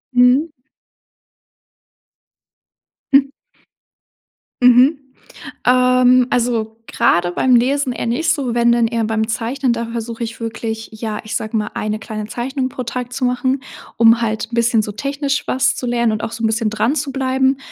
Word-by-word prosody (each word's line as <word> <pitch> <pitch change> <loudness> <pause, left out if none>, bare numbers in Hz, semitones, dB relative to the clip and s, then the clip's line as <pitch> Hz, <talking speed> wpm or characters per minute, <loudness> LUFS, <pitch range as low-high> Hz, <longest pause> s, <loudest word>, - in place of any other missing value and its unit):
Mmh. 250 +6 +4 2.6
Hm. 275 0 +5 1.3
Mhm. 250 +4 +6 0.7
Ähm, 255 0 +4
also 230 -2 -1
grade 175 0 +1
beim 255 +6 +2
Lesen 260 +1 +1
eher 235 - -4
nicht 310 +7 +1
so, 255 -6 -3
wenn 235 0 +3
denn 235 -1 +3
eher 230 -1 -1
beim 220 0 -1
Zeichnen. 240 +3 -1
Da 230 0 -3
versuche 230 0 -5
ich 225 0 -6
wirklich, 225 0 -5
ja, 215 -1 -5
ich 215 - -5
sage 220 +1 -3
mal, 210 0 -3
1 215 0 -2
kleine 215 -2 -6
Zeichnung 255 +4 -3
pro 255 - -6
Tag 245 +1 -5
zu 255 - -4
machen, 260 +2 0 0.4
um 230 +1 +5
halt 220 0 -2
'n 235 - -4
bisschen 230 -1 +2
so 210 - -5
technisch 280 +4 -3
was 260 - +1
zu 250 - -5
lernen 235 -2 +1
und 215 - -4
auch - - -3
so 230 0 -6
'n - - +3
bisschen 220 0 0
dran 220 +7 0
zu 280 -3 -2
bleiben, 265 0 +1
240 Hz, 165 wpm, -18 LUFS, 225-260 Hz, 2.6 s, Mhm